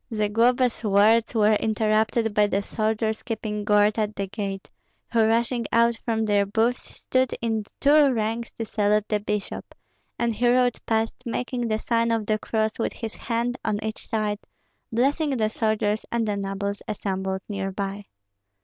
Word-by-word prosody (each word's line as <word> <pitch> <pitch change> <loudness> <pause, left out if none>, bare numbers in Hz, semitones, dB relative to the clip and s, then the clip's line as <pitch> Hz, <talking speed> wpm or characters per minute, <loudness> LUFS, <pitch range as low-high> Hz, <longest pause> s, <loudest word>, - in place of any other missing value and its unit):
Zagloba's 230 +4 +2
words 215 +3 +4
were 215 -1 +4
interrupted 220 +1 +1
by 210 0 +4
the 200 0 0
soldiers 220 +1 -1
keeping 215 -3 -4
guard 210 +1 +3
at 210 -1 -1
the 200 - -2
gate, 195 -1 -5 0.4
who 225 -2 +4
rushing 235 0 +1
out 235 0 +4
from 225 -1 -1
their 205 -1 +3
booths 225 +5 +1
stood 255 -1 -1
in 220 -2 -1
two 290 -1 +5
ranks 230 0 -2
to 225 - -4
salute 210 0 +1
the 210 - +1
bishop; 210 -1 -4 0.4
and 235 -1 0
he 240 +3 +2
rode 245 -1 +2
past, 225 0 0
making 245 0 -2
the 215 -1 0
sign 230 +1 0
of 225 -2 0
the 215 +1 0
cross 220 0 0
with - - -1
his 225 -2 -6
hand 240 +1 -2
on 205 - 0
each 220 0 -5
side, 210 -2 -1 0.5
blessing 275 +4 +1
the 215 -1 +1
soldiers 215 -1 0
and 235 -2 0
the 205 - 0
nobles 200 0 -3
assembled 190 -2 -3
near 195 -2 -3
by. 200 +1 -4
220 Hz, 165 wpm, -25 LUFS, 210-230 Hz, 0.5 s, two